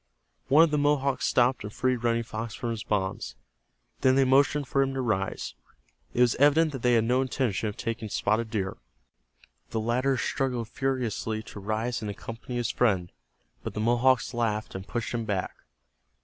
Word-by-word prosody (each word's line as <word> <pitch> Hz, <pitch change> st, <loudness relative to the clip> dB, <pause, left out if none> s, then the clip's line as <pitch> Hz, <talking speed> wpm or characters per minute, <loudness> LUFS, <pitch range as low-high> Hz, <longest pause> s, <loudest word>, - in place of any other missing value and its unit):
One 150 Hz, +4 st, +7 dB
of 165 Hz, -, +2 dB
the 150 Hz, -, +2 dB
Mohawks 140 Hz, -2 st, +1 dB
stooped 125 Hz, 0 st, +2 dB
and 105 Hz, -, -6 dB
freed 130 Hz, +3 st, 0 dB
Running 115 Hz, 0 st, +2 dB
Fox 110 Hz, 0 st, -5 dB
from 120 Hz, -, -3 dB
his 115 Hz, -1 st, -4 dB
bonds. 95 Hz, -, -2 dB, 0.6 s
Then 130 Hz, 0 st, +4 dB
they 135 Hz, -, +5 dB
motioned 140 Hz, +2 st, +3 dB
for 135 Hz, -, +2 dB
him 135 Hz, 0 st, 0 dB
to -, -, -2 dB
rise. 95 Hz, -, -2 dB, 0.6 s
It 125 Hz, -, +2 dB
was 120 Hz, -1 st, +5 dB
evident 150 Hz, +3 st, +4 dB
that 135 Hz, -4 st, -6 dB
they 125 Hz, 0 st, +3 dB
had 115 Hz, -, +4 dB
no 125 Hz, +3 st, +2 dB
intention 125 Hz, -5 st, -1 dB
of 105 Hz, -, -8 dB
taking 115 Hz, -2 st, -4 dB
Spotted 110 Hz, +3 st, 0 dB
Deer. 95 Hz, -3 st, -2 dB, 0.9 s
The 110 Hz, -, -2 dB
latter 125 Hz, +4 st, +1 dB
struggled 125 Hz, -3 st, -1 dB
furiously 120 Hz, -4 st, -2 dB
to 105 Hz, -, -10 dB
rise 110 Hz, +4 st, -2 dB
and 105 Hz, -, -4 dB
accompany 115 Hz, +4 st, -7 dB
his 120 Hz, -1 st, 0 dB
friend, 95 Hz, -9 st, +1 dB, 0.5 s
but -, -, -5 dB
the -, -, -2 dB
Mohawks 120 Hz, +3 st, +2 dB
laughed 110 Hz, -2 st, -1 dB
and 95 Hz, 0 st, -7 dB
pushed 120 Hz, 0 st, -3 dB
him 120 Hz, -1 st, -1 dB
back. 100 Hz, -3 st, -2 dB
120 Hz, 180 wpm, -27 LUFS, 110-130 Hz, 0.9 s, One